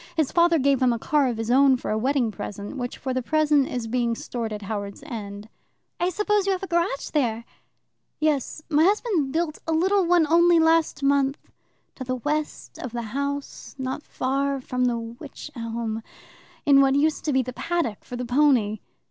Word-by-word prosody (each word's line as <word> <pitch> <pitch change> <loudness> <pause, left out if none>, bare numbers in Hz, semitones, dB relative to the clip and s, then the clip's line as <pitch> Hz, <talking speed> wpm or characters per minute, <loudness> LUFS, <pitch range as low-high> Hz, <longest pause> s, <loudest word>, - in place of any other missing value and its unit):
His 315 -4 +1
father 340 -1 +4
gave 275 -2 +2
him 255 -1 +4
a 235 - 0
car 285 +4 +1
of 240 -3 -2
his 225 +1 -2
own 270 0 +5
for - - -4
a 215 - +1
wedding 255 -1 +1
present, 205 +3 -7
which 245 -2 -4
for 260 0 -3
the 255 - -1
present 300 0 +2
is 245 -2 -4
being 235 0 0
stored 230 -1 -5
at 210 -1 -5
Howards 200 +3 -5
End." 210 -6 -7 0.5
"I 350 - +2
suppose 415 +1 +1
you 390 - +3
have 375 - -4
a - - -3
garage 340 -5 -1
there?" 235 -6 0 0.7
"Yes. 305 0 -1
My 305 0 +3
husband 385 - +1
built 320 0 -1
a - - 0
little 380 +5 +3
one 345 -1 +4
only 340 +2 +5
last 325 -2 +2
month, 275 0 +2 0.6
to 260 - -7
the 255 0 -2
west 295 +4 -3
of 250 -2 -6
the 235 -1 -3
house, 280 +1 -4
not 260 +1 -3
far 275 0 -1
from 250 -1 -1
the 240 -1 +1
wych 235 +6 -9
elm, 230 -1 -4 0.6
in 275 -1 +6
what 270 0 +3
used 300 +2 +1
to 305 - +1
be 260 0 +3
the 250 +1 -6
paddock 335 -9 -2
for 245 - -8
the 250 0 -4
pony." 245 -5 +2
275 Hz, 195 wpm, -24 LUFS, 240-310 Hz, 0.7 s, in